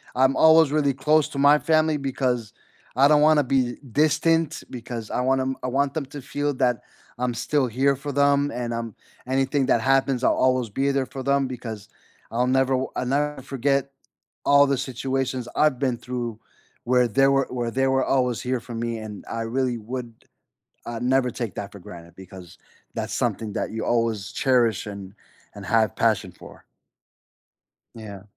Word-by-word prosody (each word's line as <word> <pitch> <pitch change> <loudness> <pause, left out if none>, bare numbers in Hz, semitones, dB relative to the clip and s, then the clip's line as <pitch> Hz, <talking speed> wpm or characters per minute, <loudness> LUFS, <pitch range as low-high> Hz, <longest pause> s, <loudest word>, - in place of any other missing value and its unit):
I'm 130 +1 +3
always 160 -2 +6
really 145 -2 +2
close 150 +3 +2
to 140 - -6
my 145 +1 +6
family, 155 -1 +2
because 125 -5 -2 0.4
I 135 +2 +5
don't 150 0 +4
wanna 155 -1 +5
be 130 -2 0 0.3
distant, 160 +1 +1
because 120 -3 -7
I 125 - -1
want 130 +1 +2
'em 130 0 -2
I - - -1
want 135 +2 0
them 155 -3 -3
to 145 0 -9
feel 145 +2 -2
that 125 -3 +1 0.4
I'm 125 -1 -1
still 135 +3 0
here 135 +4 +1
for 145 +2 -6
them, 140 +1 +2
and, 120 -1 -4
um, 115 -2 -5 0.3
anything 135 +1 +1
that 115 - +3
happens 135 0 +1
I'll - - +4
always 130 -2 +1
be 135 +7 0
there 135 -1 0
for 135 - -8
them, 140 0 +1
because 115 -5 -7 0.4
I'll 125 +2 0
never 130 +1 +2
w 130 0 -1
I'll - - -1
never 145 +2 -1
forget 135 +1 -1 0.5
all 140 0 +6
the 135 -1 +1
situations 130 -1 -3
I've 150 -4 +3
been 130 -3 0
through 120 -2 -5 0.5
where 125 0 +3
they 135 +5 +3
were 135 -1 +3
where 120 -2 -2
they 135 +2 +1
were 135 0 +2
always 125 -3 +1
here 125 0 -1
for 120 +1 -10
me, 115 0 -3
and 105 -2 -8
I 115 - -3
really 125 +1 -1
would, 120 +1 -6 0.7
uh, 120 -1 -4
never 125 0 +2
take 115 -4 -5
that 100 0 -6
for 100 - -10
granted, 85 -1 -12
because 95 -2 -12 0.4
that's - - -4
something 110 -2 -2
that - - -2
you 110 - -3
always 115 -4 0
cherish, 120 -7 +1
and 100 -2 -8 0.4
and 100 - -9
have 110 -3 +2
passion - - +1
for. - - -15 1.3
Yeah. 100 -4 -9
130 Hz, 180 wpm, -24 LUFS, 115-140 Hz, 1.3 s, always